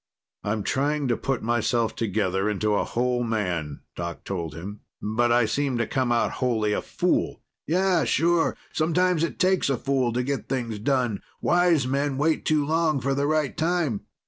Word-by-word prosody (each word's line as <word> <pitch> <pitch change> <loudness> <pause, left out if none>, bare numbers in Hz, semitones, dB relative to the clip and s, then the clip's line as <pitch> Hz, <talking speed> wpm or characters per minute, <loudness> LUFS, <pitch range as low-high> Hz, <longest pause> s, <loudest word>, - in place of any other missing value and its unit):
"I'm 105 0 -1
trying 145 +3 0
to 120 - +3
put 135 +1 -2
myself 120 0 +1
together 100 -2 0
into 105 +1 0
a 100 - +2
whole 125 0 0
man," 90 -10 -2
Doc 85 0 -5
told 85 -6 -4
him. 100 +5 -7 0.2
"But 120 +3 +1
I 120 -1 +4
seem 135 +3 0
to 120 - +1
come 130 -1 0
out 120 - +2
wholly 110 -4 +1
a - - 0
fool." - - -1 0.2
"Yeah, 180 0 +2
sure. 170 0 +2 0.2
Sometimes 170 +1 +2
it 170 - -2
takes 185 -4 +2
a 135 - +1
fool 130 -2 0
to 125 +1 0
get 140 +1 -3
things 120 -5 -2
done; 125 -3 0 0.2
wise 175 -5 +3
men 140 +1 0
wait 155 +3 +1
too 150 -2 +2
long 160 -1 +1
for 135 +2 0
the 140 +1 0
right 155 -3 0
time. 160 - 0
125 Hz, 175 wpm, -25 LUFS, 110-150 Hz, 0.2 s, I